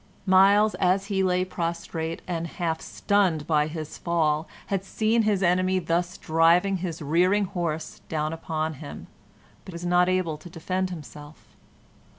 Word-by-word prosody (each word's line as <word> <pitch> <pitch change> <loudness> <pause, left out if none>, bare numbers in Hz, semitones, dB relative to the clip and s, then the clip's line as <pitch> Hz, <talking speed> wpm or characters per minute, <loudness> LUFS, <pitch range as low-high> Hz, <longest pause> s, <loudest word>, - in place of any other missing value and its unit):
Myles, 200 +3 +5
as 190 +2 +2
he 190 - +2
lay 185 -1 +2
prostrate 165 -2 -4
and 170 -2 -2
half 165 -1 -3
stunned 185 -7 +1
by 150 -2 +2
his 155 -1 -7
fall, 160 -2 0 0.2
had 195 -1 -2
seen 220 +3 +1
his 210 -3 +1
enemy 185 +1 +2
thus 175 +2 -1
driving 170 +4 +3
his 170 -3 -5
rearing 180 +7 +3
horse 170 -5 -4
down 155 0 -1
upon 160 -1 -3
him, 145 - -8 0.6
but 190 - -10
was 170 +1 -6
not 180 +1 +3
able 185 -4 0
to 175 - -12
defend 185 +3 -2
himself. 150 -3 -11
175 Hz, 150 wpm, -26 LUFS, 160-185 Hz, 0.6 s, Myles